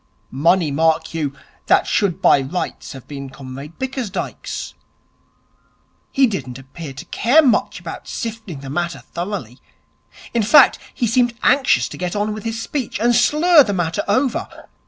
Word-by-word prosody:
Money, 165 +4 +2
mark 160 +2 +1
you, 155 -4 -2 0.4
that - - +4
should 190 -3 0
by 140 - +6
rights 155 +7 -4
have 135 -2 -11
been 140 -2 -7
Comrade 135 +3 -10
Bickersdyke's. 260 -6 -4 1.4
He 270 - +4
didn't 190 - -4
appear 140 +3 -9
to 135 - -9
care 275 +8 +3
much 210 -6 +1
about 170 -1 -8
sifting 220 -10 -6
the 135 - -8
matter 170 +2 -3
thoroughly. 170 - -5 0.7
In 235 - +2
fact, 265 +6 +6
he 240 - -2
seemed 240 +1 +2
anxious 270 0 +3
to - - -9
get 180 +1 -3
on 210 +1 -1
with 215 0 -8
his 225 0 -3
speech, 255 +1 -4
and 240 +2 +3
slur 300 +8 +5
the 205 - -2
matter 170 -3 -1
over. 250 +5 -1
190 Hz, 155 wpm, -20 LUFS, 150-235 Hz, 1.4 s, by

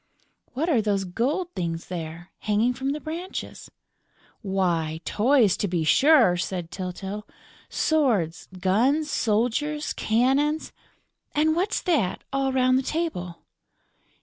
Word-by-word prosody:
"What 290 +6 -1
are 270 -10 +3
those 200 -2 0
gold 265 - -2
things 170 -2 -3
there, 170 0 -7
hanging 220 +4 +1
from 265 +2 -3
the 295 +2 -2
branches?" 335 +5 -6 0.7
"Why, 175 -6 0
toys, 230 -3 +3
to 205 - -1
be 175 -3 -1
sure!" 240 - +5
said 175 -1 -3
Tyltyl. 190 +3 -5 0.4
"Swords, 235 - +1
guns, 260 - +2
soldiers, 250 +8 0
cannons...." 270 +7 +1 0.6
"And 315 +1 +3
what's 380 +5 0
that, 290 - 0
all 270 -1 +1
round 255 0 +3
the - - 0
table?" 260 - -3
230 Hz, 120 wpm, -25 LUFS, 185-295 Hz, 0.7 s, sure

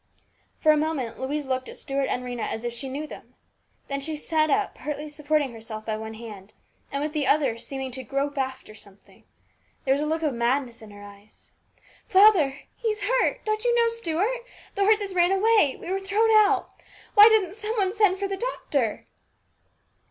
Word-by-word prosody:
FOR 310 - +5
a 305 - +3
moment 295 -6 -2
Louise 285 +3 -3
looked 260 -1 -2
at - - -10
Stuart 275 0 -2
and 250 - -2
Rhena 245 -2 -5
as 220 - -4
though 240 - -2
she 235 +3 -6
knew 285 +4 -4
them. - - -12 0.5
Then 275 0 -3
she 310 +2 -3
sat 310 +1 0
up 410 +3 +1
partly 300 +2 -5
supporting 295 -2 -1
herself 220 -1 -8
by 220 - -2
one 220 0 -7
hand, 215 -3 -10 0.4
and 280 +1 -2
with 305 0 -3
the 295 -4 0
other 275 -4 +3
seeming 265 +2 -6
to 260 +1 -5
grope 275 +4 -2
after 260 -4 -4
something. 200 -2 -17 0.6
There 265 - +4
was 280 - -1
a 300 - -1
look 320 +1 -1
of 300 -4 +1
madness 240 0 -1
in 220 - -12
her 205 0 -12
eyes. 205 +1 -16 0.3
" - - -29
Father! 375 -9 +5
He's 430 -3 -2
hurt! - - +1
Don't 430 0 -1
you 480 -1 +2
know, 470 -1 +4
Stuart? 460 +2 -2 0.3
The 400 -1 +1
horses 410 -2 +2
ran 350 0 +3
away. 395 -7 +3
We 350 - -6
were 385 - 0
thrown 410 +4 +2
out! 420 -3 +4 0.4
Why 420 0 +9
doesn't 405 -5 +2
some 430 +1 -4
one 385 -2 +1
send 410 -4 +3
for 400 +1 -2
the 390 0 -4
doctor 285 - -2
300 Hz, 195 wpm, -25 LUFS, 260-400 Hz, 0.6 s, Why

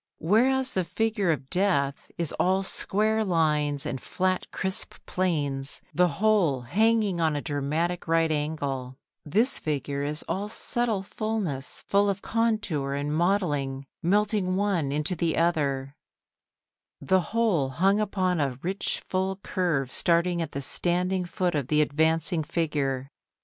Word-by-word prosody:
Whereas 255 +8 +2
the 185 - +1
figure 215 0 0
of 140 -4 -1
Death 175 -8 0
is 170 -3 -2
all 190 +2 +2
square 215 +3 0
lines 150 -5 +1
and 135 -4 -3
flat 185 0 -1
crisp 190 0 -2
planes, 145 -7 -1
the 180 +1 +4
whole 175 -6 +2
hanging 205 - +2
on 160 -2 +2
a - - 0
dramatic 155 +6 -2
right 165 0 +2
angle; 140 -4 -3 0.3
this 225 - +2
figure 140 -2 -2
is 150 +2 -1
all 205 +2 -2
subtle 225 -2 0
fullness 200 - -3
both 200 0 +4
of 200 0 -2
contour 205 -12 0
and 145 +1 -2
modelling 150 -7 0 0.2
melting 200 0 +1
one 190 -8 0
into 150 +5 0
the 165 -1 0
other, 140 -5 0 1.0
the 190 0 +2
whole 205 -10 +1
hung 190 +9 +2
upon 185 -4 0
a 135 -3 -1
rich 190 +3 -2
full 190 +1 0
curve 160 -9 -1
starting 170 0 +2
at 165 - -4
the 140 - -3
standing 180 +5 +1
foot 180 0 -1
of 145 -5 -1
the 150 +1 +2
advancing 160 +2 +1
figure. 145 -4 -2
170 Hz, 140 wpm, -27 LUFS, 145-195 Hz, 1.0 s, the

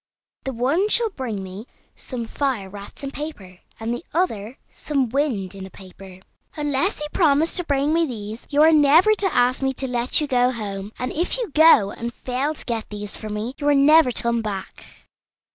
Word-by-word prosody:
The 270 - -2
one 280 - +1
shall 460 0 +3
bring 230 - -4
me 190 +5 -8 0.3
some 245 -3 -6
fire 245 -5 -2
wrapped 200 +7 -10
in 275 - -4
paper, 205 - -7 0.2
and 225 +1 -2
the 240 - -5
other 235 - -1
some 275 -5 -1
wind 235 -8 -1
in 195 -1 -8
a 190 - -8
paper. 190 0 -13 0.3
Unless 295 +5 0
you - - -2
promise 315 -2 +3
to 355 - 0
bring 285 0 +1
me 330 0 +2
these, 220 -2 -7
you 295 +1 +4
are 320 - +7
never 315 +7 +6
to 395 -3 0
ask 250 0 +2
me 265 0 0
to 265 +1 -4
let 245 0 +1
you 300 - 0
go 250 -3 +2
home; 205 -3 -5
and 250 - -3
if 345 +9 -1
you 475 -9 -3
go, 295 -10 +6
and 235 +1 -6
fail 265 +5 -2
to - - -8
get 230 -3 -3
these 205 -1 -5
for 215 - -7
me, 210 +4 -4
you 290 - -2
are 290 - +5
never 295 0 +6
to - - -4
come 235 0 +1
back." 200 -3 -8
255 Hz, 205 wpm, -22 LUFS, 215-300 Hz, 0.3 s, are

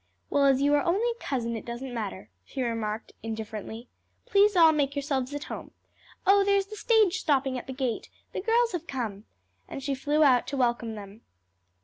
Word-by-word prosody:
"Well, 280 - +3
as 275 0 +4
you 290 +1 +3
are 290 - +4
only 395 +8 +1
a 470 - -10
cousin 235 -4 -2
it 225 - -5
doesn't 245 +2 -6
matter," 205 - -5
she 260 - -4
remarked 225 -2 -3
indifferently. 220 +1 -6 0.4
"Please 410 0 +4
all 330 -2 +7
make 285 -2 0
yourselves 275 -2 -1
at 290 - -4
home. - - -8 0.5
Oh 395 +1 +6
there's 400 0 +2
the 425 +2 -9
stage 425 -4 +3
stopping 270 -4 +1
at 250 - -6
the - - -5
gate! 255 -3 -3 0.2
the - - -3
girls 460 +3 +2
have 345 -2 -4
come!" 220 -6 -4 0.4
and 270 - -7
she 280 0 -1
flew 295 +3 +2
out 255 -4 +4
to 280 - -3
welcome 240 -3 0
them. 205 +1 -10
270 Hz, 195 wpm, -27 LUFS, 235-340 Hz, 0.5 s, all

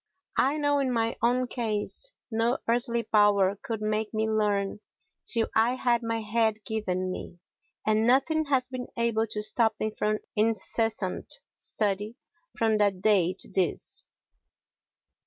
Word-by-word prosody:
I 275 +4 +3
know 290 -1 +2
in 265 -2 0
my 230 -1 0
own 245 +2 +2
case 235 - -3 0.2
no 230 +3 +1
earthly 235 0 +1
power 205 -3 +4
could 225 -2 -4
make 215 0 -1
me 220 0 +1
learn 210 -2 0 0.4
till 230 -2 +4
I 230 +3 +3
had 240 -2 +1
my 230 -1 -2
head 220 0 0
given 185 -4 -2
me; 175 - -7 0.5
and 215 +1 +2
nothing 310 +5 +3
has 265 -3 +1
been 255 -1 -6
able 230 -1 +1
to 210 0 -1
stop 220 +1 +3
me 215 0 -1
from 215 0 0 0.2
incessant 220 -2 0 0.2
study 210 +1 -2 0.4
from 220 -2 +2
that 195 -3 +1
day 190 -4 +3
to - - -12
this. 185 -4 -2
220 Hz, 140 wpm, -27 LUFS, 210-235 Hz, 0.5 s, power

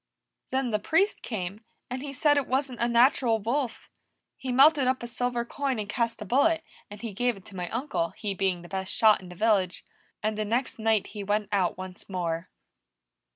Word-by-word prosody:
"Then 260 -2 0
the 210 - +1
Priest 385 - +2
came, 195 -3 -4 0.3
and 255 +1 -4
he 285 0 -5
said 290 +2 +3
it 285 -3 +1
wasn't 260 -1 -1
a 235 - +2
natural 240 -1 +4
wolf. 240 +4 -2 0.5
He 260 - -4
melted 275 +1 +6
up 255 -1 +1
a - - -2
silver 240 0 -2
coin 275 0 -2
and 210 -1 -3
cast 230 0 -1
a - - -9
bullet, 315 - +3 0.3
and 205 0 -9
he 225 -3 -4
gave 245 +2 0
it 190 - -15
to 200 - -12
my 180 -2 -4
uncle, 230 - -1
he 210 -3 -2
being 185 -2 0
the - - -10
best 190 0 -3
shot 215 -3 +5
in 180 - -11
the 180 - -10
village. 195 -3 +1 0.4
And 215 0 -1
the - - +1
next 230 +3 -1
night 220 -2 +2
he 205 -2 -5
went 205 0 0
out 185 -4 +1
once 185 0 -9
more." 170 -2 -2
225 Hz, 205 wpm, -27 LUFS, 195-255 Hz, 0.5 s, melted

